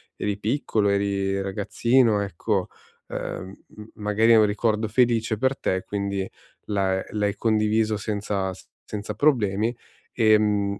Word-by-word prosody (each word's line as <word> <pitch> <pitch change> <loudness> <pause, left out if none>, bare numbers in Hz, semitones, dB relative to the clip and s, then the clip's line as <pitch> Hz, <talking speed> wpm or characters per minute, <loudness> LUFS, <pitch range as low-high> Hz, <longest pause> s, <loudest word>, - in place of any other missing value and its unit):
eri 100 -1 -2
piccolo, 110 -2 0
eri 100 -1 0
ragazzino, 105 +3 +2
ecco, 100 0 -1 0.4
ehm, 95 +1 -6 0.2
m 105 - -9
magari 105 +2 +3
è - - +7
un 110 - +6
ricordo 110 +1 0
felice 115 -1 +2
per 130 +4 +1
te, 95 0 -1
quindi 100 -1 -3 0.4
l'ha 95 -2 0
ehm, - - -8
l'hai 105 0 0
condiviso 110 0 +1
senza 100 -2 -2
s - - -15 0.2
senza 105 0 -5
problemi, 110 -4 +2 0.4
ehm, 105 -3 +2
105 Hz, 135 wpm, -24 LUFS, 100-110 Hz, 0.4 s, è